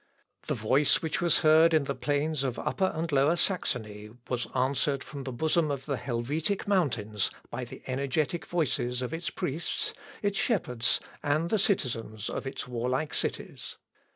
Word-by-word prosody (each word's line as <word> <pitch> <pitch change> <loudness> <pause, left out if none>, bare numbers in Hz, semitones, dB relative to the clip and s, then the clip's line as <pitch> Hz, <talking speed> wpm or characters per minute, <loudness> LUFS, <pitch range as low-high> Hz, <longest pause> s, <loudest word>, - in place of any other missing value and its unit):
The - - 0
voice 130 +8 +3
which 160 0 -1
was 170 -2 +4
heard 160 +1 +6
in 155 - +4
the 140 - -2
plains 145 +2 0
of 130 -3 -1
Upper 190 -1 0
and 160 0 -2
Lower 140 +4 +4
Saxony 110 - -1 0.2
was 125 -1 -1
answered 135 +1 +1
from 140 -3 -8
the 130 - -3
bosom 160 +5 +1
of 140 -2 -3
the 140 - -1
Helvetic 145 - -1
mountains 115 - +1 0.2
by - - -3
the - - -11
energetic 140 +5 -1
voices 125 -7 0
of 125 - -4
its 165 +1 -2
priests, 175 - -2 0.3
its 200 -1 +1
shepherds, 125 - +2 0.2
and 155 +3 +1
the 220 - +3
citizens 115 - -1
of - - -4
its 135 - -5
warlike 125 +5 -1
cities. - - -3
140 Hz, 160 wpm, -29 LUFS, 125-165 Hz, 0.3 s, heard